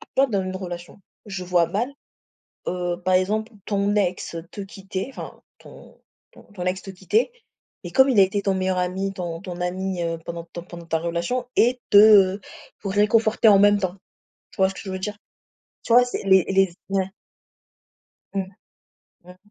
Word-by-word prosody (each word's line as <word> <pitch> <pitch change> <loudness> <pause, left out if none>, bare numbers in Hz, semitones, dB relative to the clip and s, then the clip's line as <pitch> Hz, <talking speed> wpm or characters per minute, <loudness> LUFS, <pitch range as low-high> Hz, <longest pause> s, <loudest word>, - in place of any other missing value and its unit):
tu - - -14
vois 270 +1 +5
dans 200 -6 -1
une 185 0 -4
relation, 175 0 -8 0.3
je 195 -3 -5
vois 175 -2 +3
mal, 240 +7 -2 0.8
heu, 175 -1 -2
par 185 0 +2
exemple, 215 +5 +1
ton 200 0 0
ex 180 -3 -1 0.2
te 205 - -7
quitter, 195 0 -6
enfin - - -9 0.2
ton - - -15 0.3
ton - - -16
ton 180 -3 -6
ex 185 +1 -1
te 195 - -8
quitter 195 - 0 0.5
et - - -6
comme 265 0 +5
il 240 -6 +2
a - - +9
été 200 +1 +1
ton 195 -1 +1
meilleur 185 0 0
ami, 190 +2 -1
ton 175 -3 -5
ton 180 -2 -7
ami, 185 0 -2
heu, 165 -1 -2
pendant 170 0 -6
ton 170 - -6
pendant 170 -1 -11
ta 165 -1 0
relation 170 +10 -2
et 245 +1 +3
te 205 -2 +7 0.4
pour 195 -2 -4
réconforter 220 +2 +3
en 200 -2 +7
même 205 0 +5
temps. 185 -1 -2 0.6
Tu - - -19
vois 190 0 +4
ce - - -7
que - - -8
je 195 - -7
veux 190 - -4
dire? 210 +2 -4 0.7
Tu 230 - -2
vois, 245 +1 +7
c'est 245 - -4
les 190 -2 +5
les 195 0 +4
z - - -18 0.2
ouais. 190 -1 0 1.2
Mmh. 195 -1 0 0.8
Mmh. 180 0 -14
190 Hz, 190 wpm, -23 LUFS, 180-205 Hz, 1.2 s, a